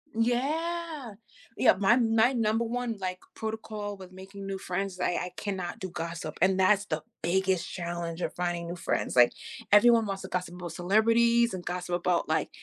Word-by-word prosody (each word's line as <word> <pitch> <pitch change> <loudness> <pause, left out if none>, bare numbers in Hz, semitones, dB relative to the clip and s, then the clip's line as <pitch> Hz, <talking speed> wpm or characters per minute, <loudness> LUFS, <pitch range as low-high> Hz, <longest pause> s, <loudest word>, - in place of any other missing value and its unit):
Yeah, 295 +3 -1 0.4
yeah, - - +6
my 200 +4 +4
my 225 +1 +3
number 225 -1 +1
one, 240 -1 -2
like, 185 -1 -3 0.2
protocol 215 -2 -5
with 185 -1 -11
making 195 +1 -10
new 195 0 -3
friends 190 +1 -3
is 180 - -13
I 180 - +1
I 180 0 -3
cannot 185 -4 -4
do 185 - -5
gossip, 165 -2 -5
and 190 0 +3
that's 205 +2 +4
the 155 -5 -3 0.2
biggest 185 +1 +1
challenge 170 -1 -4
of - - -2
finding 175 -1 -2
new 175 - -4
friends. 175 - -2
Like, 120 -1 +6 0.4
everyone 230 +1 +6
wants 195 -1 -4
to - - -6
gossip 180 -1 -3
about 175 -2 -6
celebrities 230 +5 +3
and 180 -1 -6
gossip 175 0 -2
about, 175 -2 0
like 160 - +1
190 Hz, 180 wpm, -28 LUFS, 175-225 Hz, 0.4 s, yeah